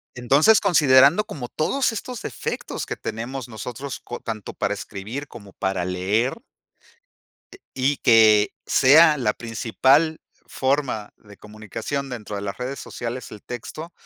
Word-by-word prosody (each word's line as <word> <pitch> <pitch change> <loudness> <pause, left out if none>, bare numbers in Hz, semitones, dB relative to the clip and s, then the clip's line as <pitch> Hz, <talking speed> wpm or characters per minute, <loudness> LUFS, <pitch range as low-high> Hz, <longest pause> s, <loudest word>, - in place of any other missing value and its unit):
Entonces, 140 - +4
considerando 150 -1 +5
como 125 -5 -7
todos 255 - 0
estos 230 +2 -6
defectos - - -5
que - - -4
tenemos 125 +3 -5
nosotros, 125 +5 -6
co 120 - -8
tanto 110 -3 -6
para 100 - -1
escribir, 110 +8 -7
como 100 -7 -13
para 95 -2 -2
leer 95 +7 0 1.2
eh, 390 - -13 0.2
y 135 +2 0
que 110 -3 +5 0.2
sea 150 +3 +6
la 110 -6 0
principal 130 +7 +1 0.3
forma 130 -6 -1
de 100 -2 -17
comunicación 110 +6 -6
dentro 110 -4 -6
de 100 - -4
las 100 -1 -5
redes 130 +2 -5
sociales, 120 +1 -6
el 105 - -10
texto, 155 +7 -7
125 Hz, 135 wpm, -23 LUFS, 110-140 Hz, 1.2 s, sea